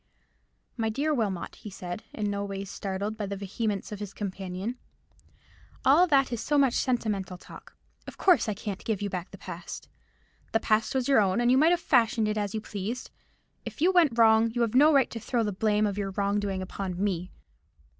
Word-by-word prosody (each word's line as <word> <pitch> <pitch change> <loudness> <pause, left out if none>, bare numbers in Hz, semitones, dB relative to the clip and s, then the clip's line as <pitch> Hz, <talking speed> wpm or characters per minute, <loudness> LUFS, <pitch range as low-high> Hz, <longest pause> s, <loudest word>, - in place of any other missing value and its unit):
"My 225 -1 0
dear 285 +7 0
Wilmot," 210 -9 -2
he 210 - -9
said, 185 +1 -7
in 210 -1 -3
no 200 0 -2
wise 195 -1 -5
startled 200 +2 -3
by 210 -2 -4
the 200 - -4
vehemence 200 +1 -3
of 210 - -6
his 205 -2 -7
companion, 195 +3 -5 1.1
"all 320 +7 +6
that 275 -5 +3
is 230 - -3
so 295 +5 +1
much 270 -4 +4
sentimental 210 -9 -1
talk. - - -14 0.3
Of - - -9
course 360 - +4
I 210 - -2
can't 200 -1 -6
give 210 -3 -2
you 200 - -2
back 180 -1 -4
the - - -11
past. - - -8 0.6
The 225 - +4
past 220 +3 +1
was 260 -2 +1
your 270 -5 +5
own, 190 +1 +1
and 240 0 +3
you 260 - +5
might 315 +3 +5
have 350 0 +3
fashioned 235 -6 +3
it 210 - -1
as 205 -1 -2
you 215 - -2
pleased. 215 +3 -5 0.5
If - - -8
you 350 +5 +4
went 325 -10 +3
wrong, 225 0 +5
you 240 - 0
have 230 -2 +1
no 295 +5 +6
right 275 -4 +3
to 230 - -5
throw 230 +1 -1
the 210 - -1
blame 210 +2 +2
of 205 -1 -2
your 195 -1 -2
wrong 200 +1 0
doing 195 -2 -2
upon 185 -1 -5
me. 185 -3 -2
215 Hz, 210 wpm, -28 LUFS, 200-245 Hz, 1.1 s, all